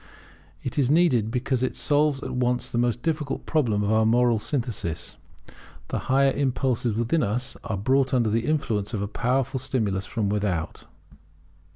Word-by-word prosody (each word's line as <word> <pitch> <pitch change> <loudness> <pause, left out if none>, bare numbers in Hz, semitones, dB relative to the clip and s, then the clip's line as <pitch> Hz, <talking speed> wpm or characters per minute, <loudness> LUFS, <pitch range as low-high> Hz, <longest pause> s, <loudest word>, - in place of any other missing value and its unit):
It 130 - -3
is 130 -3 +3
needed, 145 -9 +3
because 125 +1 -1
it 130 - -1
solves 145 -2 +1
at - - -4
once 125 0 0
the 120 - 0
most 120 0 0
difficult 150 -3 -2
problem 115 -10 +1
of 100 - 0
the 110 0 +3
moral 120 0 +3
synthesis. 105 - -3 0.7
The - - -1
higher 135 +1 +4
impulses 130 -4 0
within 120 +8 +1
us 120 +4 -1
are 105 - -3
brought 130 +6 +2
under 120 -4 +2
the 115 +2 0
influence 115 -9 -1
of 100 - -2
a - - -2
powerful 130 +4 0
stimulus 105 -7 -1
from 110 -3 -1
without. 100 -5 -2
125 Hz, 165 wpm, -25 LUFS, 110-135 Hz, 0.7 s, higher